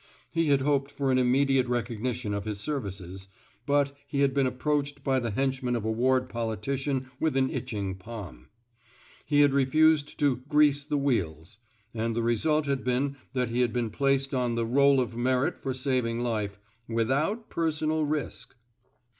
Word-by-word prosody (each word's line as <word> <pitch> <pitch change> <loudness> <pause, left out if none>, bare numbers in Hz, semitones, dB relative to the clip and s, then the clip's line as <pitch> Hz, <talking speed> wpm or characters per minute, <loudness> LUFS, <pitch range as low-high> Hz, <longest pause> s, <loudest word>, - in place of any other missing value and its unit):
He 165 -1 +1
had 140 -2 +3
hoped 140 0 +1
for 140 -1 -1
an 130 - +3
immediate 130 +1 +3
recog 120 -2 -2
nition 120 -4 -2
of 100 0 -4
his 105 -2 -3
services, 95 - -5 0.4
but 140 -1 +2
he 140 -2 -1
had 140 -1 +3
been 135 -1 +2
approached 145 +2 -1
by 135 -1 +2
the 120 -2 -2
henchman 130 +2 -1
of 115 -3 -3
a 110 - 0
ward 130 +3 +2
politician 130 +4 -2
with 155 -4 +1
an 130 0 +2
itching 105 -6 -3
palm. 95 - -9 0.8
He 145 -1 +4
had 145 -2 +5
refused 145 +2 +3
to 145 -5 +2
grease 150 -2 +4
the 150 - -1
wheels; 95 - -1 0.3
and 115 0 -2
the 115 - 0
result 150 +7 +1
had 140 -2 -1
been 130 +3 0 0.2
that 125 -2 0
he 120 +2 +1
had 120 -2 +1
been 120 -3 -1
placed 135 +2 +1
on 125 -2 0
the' 115 0 0
Roll 140 +3 +4
of 120 -2 -2
Merit 125 +2 +1
for 135 - -4
saving 125 -3 -1
life 105 -5 -2 0.3
without 135 - 0
personal 155 -1 0
risk. 150 -1 -3
130 Hz, 170 wpm, -28 LUFS, 115-140 Hz, 0.8 s, had